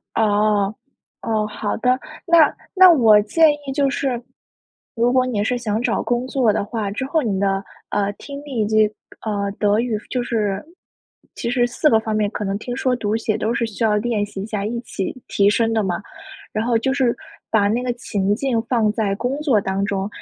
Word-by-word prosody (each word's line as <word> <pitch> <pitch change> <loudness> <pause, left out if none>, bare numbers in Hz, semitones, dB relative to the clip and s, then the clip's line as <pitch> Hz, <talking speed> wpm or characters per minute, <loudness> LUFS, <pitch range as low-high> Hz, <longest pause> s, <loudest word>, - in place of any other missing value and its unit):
哦， 210 -1 +2 0.5
哦， 215 -2 0
好 210 0 -3
的。 250 +2 +2 0.3
那 335 -4 +5 0.2
那 370 -1 +9
我 225 -8 +6
建 315 +9 +4
议 290 -2 -6
就 280 -1 +2
是， 260 -3 -2 0.7
如 235 +2 +2
果 255 0 +3
你 215 -5 -1
是 245 +2 0
想 220 -2 -2
找 - - 0
工 245 +1 -1
作 250 -5 +2
的 215 -1 0
话， 210 -1 -3
之 225 - -3
后 315 +3 +1
你 200 -5 -1
的， 195 0 0 0.3
呃， 200 0 0
听 280 +6 -9
力 260 -6 -3
以 - - +2
及 215 0 +4 0.4
呃， 200 -2 -1
德 210 +1 +3
语， 235 -3 0
就 250 - -1
是， 210 -4 -1 0.7
其 235 - -4
实 245 -1 +2
4 245 +5 +1
个 220 -5 +4
方 220 -1 -3
面 210 -1 +1
可 210 - -4
能 195 +1 -1
听、 245 +2 -5
说、 255 -1 +1
读、 220 -1 -1
写 220 -1 -1
都 220 +2 -1
是 235 0 0
需 225 +1 -4
要 210 -1 +3
练 220 -1 0
习 200 -1 -7
一 - - -4
下， 210 -2 -3
一 235 +2 -2
起 195 -6 -4
提 200 0 +3
升 225 +2 +1
的 220 - +2
嘛， 185 -2 -1 0.5
然 215 - -1
后 235 0 +2
就 265 +4 0
是 260 -4 +1 0.3
把 205 -2 +3
那 230 +4 0
个 250 - 0
情 205 -4 -1
境 245 -3 0
放 225 -4 +2
在 205 -4 0
工 245 +6 -2
作 260 -9 +3
当 195 0 -2
中。 195 -1 -1
225 Hz, 225 characters per minute, -21 LUFS, 205-250 Hz, 0.7 s, 那